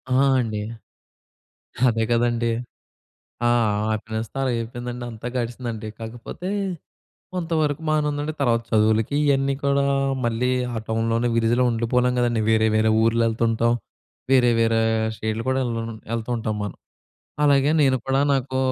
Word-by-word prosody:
ఆ! -, -, +4 dB, 0.2 s
అండి. 110 Hz, -3 st, -2 dB, 1.3 s
అదే 115 Hz, -1 st, +1 dB
కదండీ! 120 Hz, 0 st, +1 dB, 1.0 s
ఆ -, -, +4 dB, 0.4 s
హ్యాపీనెస్‌తో 110 Hz, +2 st, -4 dB
అలాగైపోయిందండి. 120 Hz, 0 st, -3 dB
అంతా 110 Hz, +1 st, -8 dB
గడిచిందండి. 120 Hz, -2 st, -4 dB
కాకపోతే, 115 Hz, +10 st, -7 dB, 0.9 s
కొంతవరకు 160 Hz, -4 st, -1 dB
బానే 155 Hz, -1 st, +2 dB
ఉందండి. 145 Hz, +1 st, -3 dB
తర్వాత 120 Hz, -4 st, +2 dB
చదువులకి 110 Hz, +3 st, +2 dB
ఇయన్నీ 135 Hz, -1 st, +2 dB
కూడా 140 Hz, 0 st, +2 dB, 0.4 s
మళ్ళీ 120 Hz, +2 st, 0 dB, 0.3 s
ఆ -, -, -3 dB
టౌన్‌లోనే 115 Hz, +1 st, 0 dB
విలేజ్‌లో 115 Hz, +2 st, +2 dB
ఉండిపోలేం 125 Hz, +2 st, +1 dB
కదండీ! 120 Hz, -2 st, +1 dB
వేరే, 110 Hz, 0 st, +3 dB
వేరే 110 Hz, 0 st, +3 dB
ఊర్లెళ్తుంటాం. 115 Hz, 0 st, +2 dB, 0.6 s
వేరే, 125 Hz, -2 st, +5 dB
వేరే 115 Hz, 0 st, +3 dB, 0.4 s
స్టేటులు 110 Hz, +2 st, -3 dB
కూడా 130 Hz, 0 st, +1 dB
ఎల్ 120 Hz, -, -2 dB, 0.4 s
ఎళ్తూ 115 Hz, +1 st, -4 dB
ఉంటాం 110 Hz, -1 st, -2 dB
మనం. 105 Hz, -, -5 dB, 0.7 s
అలాగే 140 Hz, 0 st, +4 dB
నేను 135 Hz, -2 st, +4 dB
కూడా 135 Hz, +1 st, +2 dB
నాకు 130 Hz, -1 st, -1 dB
120 Hz, 120 wpm, -23 LUFS, 115-130 Hz, 1.3 s, వేరే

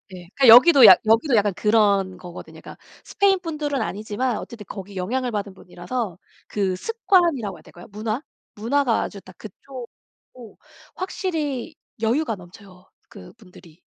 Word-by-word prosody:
예. 175 Hz, -1 st, -13 dB
그러니까 270 Hz, -, +3 dB
여기도 255 Hz, +3 st, +9 dB
약 190 Hz, -, +9 dB
여기도 230 Hz, +4 st, +3 dB
약간 205 Hz, -2 st, +2 dB
그런 200 Hz, -3 st, +1 dB
거거든요. 175 Hz, -1 st, -11 dB
그러니까 -, -, -12 dB, 0.3 s
스페인 390 Hz, -2 st, +1 dB
분들은 300 Hz, -6 st, -3 dB
아니지만 215 Hz, +3 st, -3 dB
어쨌든 225 Hz, -3 st, -9 dB
거기 195 Hz, 0 st, -9 dB
영향을 245 Hz, +7 st, -2 dB
받은 205 Hz, -2 st, -4 dB
분이라서 180 Hz, +2 st, -6 dB, 0.3 s
그 195 Hz, -3 st, -2 dB
습관이라고 340 Hz, -, 0 dB
해야 -, -, -17 dB
될까요? 175 Hz, -, -15 dB
문화? 215 Hz, +4 st, -4 dB, 0.3 s
문화가 240 Hz, +3 st, 0 dB
아주 200 Hz, -, -8 dB
다 185 Hz, -, -15 dB
그쪽이고 240 Hz, 0 st, -14 dB, 0.4 s
확실히 320 Hz, -, -4 dB, 0.3 s
여유가 230 Hz, +1 st, 0 dB
넘쳐요, 185 Hz, 0 st, -16 dB, 0.2 s
그 -, -, -13 dB
분들이. 180 Hz, -6 st, -18 dB
220 Hz, 360 characters per minute, -22 LUFS, 195-270 Hz, 0.4 s, 여기도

